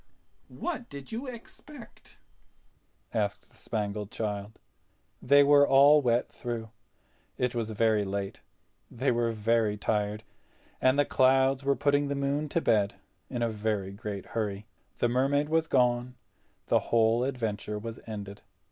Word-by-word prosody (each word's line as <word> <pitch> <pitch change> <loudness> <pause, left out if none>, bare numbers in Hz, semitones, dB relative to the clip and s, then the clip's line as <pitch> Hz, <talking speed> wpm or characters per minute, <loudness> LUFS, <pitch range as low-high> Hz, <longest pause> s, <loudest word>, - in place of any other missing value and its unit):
"What 305 -9 -5
did 140 -2 -9
you 235 +5 -5
expect?" 250 +2 -11 1.0
asked 105 -3 -2
the - - -23
Spangled 105 -2 -4
Child. 105 -3 -4 0.6
They 140 +2 +6
were 145 0 +6
all 145 +2 +6
wet 120 -2 +1
through. 115 -2 -6 0.7
It 125 -1 0
was 115 -2 -2
very 110 -1 +2
late—they 100 +6 -5
were 120 -1 +1
very 110 -1 +1
tired, 105 +1 -1 0.6
and 130 +2 +4
the 145 - +4
clouds 130 +1 +3
were 140 0 +2
putting 145 +2 +1
the 140 - -2
moon 140 +2 -1
to 170 - 0
bed 105 -6 +2 0.3
in 120 - -2
a 115 - +1
very 105 -3 -2
great 100 -1 -6
hurry. 105 -2 -2 0.3
The - - +2
Mermaid 135 +4 +1
was 160 0 +1
gone; 125 -2 +1 0.5
the - - +3
whole 115 +1 +3
adventure 110 -5 -3
was 115 +2 -7
ended. 100 -2 -7
120 Hz, 140 wpm, -28 LUFS, 105-140 Hz, 1.0 s, They